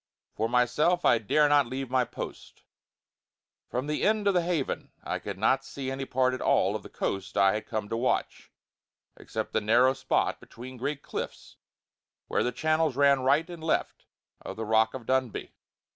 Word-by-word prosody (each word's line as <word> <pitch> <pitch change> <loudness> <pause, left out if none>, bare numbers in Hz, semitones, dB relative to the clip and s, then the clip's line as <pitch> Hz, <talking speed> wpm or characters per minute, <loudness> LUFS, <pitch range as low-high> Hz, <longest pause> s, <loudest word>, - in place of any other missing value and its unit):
For 110 +1 -1
myself 125 +9 +2
I 120 - +5
dare 150 +8 +3
not 145 -3 +4
leave 130 0 -5
my 130 -1 +3
post; - - -9 1.1
from 125 +3 -2
the 150 0 -2
end 215 -1 +2
of 200 - +4
the 180 - +3
Haven 170 -5 -2
I - - -3
could 100 -2 -6
not 130 +6 +2
see 135 -1 -5
any 135 0 -4
part 130 0 +1
at 130 - -4
all - - +2
of - - -3
the - - -12
coast 95 +1 -3
I 95 -1 +5
had 105 - -4
come 110 -2 -3
to - - -2
watch, 120 +3 -1 0.6
except - - -5
the 110 - +1
narrow 120 +5 +4
spot 135 - 0
between 130 +2 -11
great 140 +3 -3
cliffs - - -6 0.7
where - - 0
the 125 - 0
channels 155 +2 +1
ran 140 0 +4
right 140 +5 +2
and 170 -3 -9
left 160 - -1 0.3
of - - -7
the 110 - -4
Rock 110 +2 +3
of 125 -3 -7
Dunbuy. 130 -2 -1
130 Hz, 185 wpm, -28 LUFS, 115-145 Hz, 1.1 s, I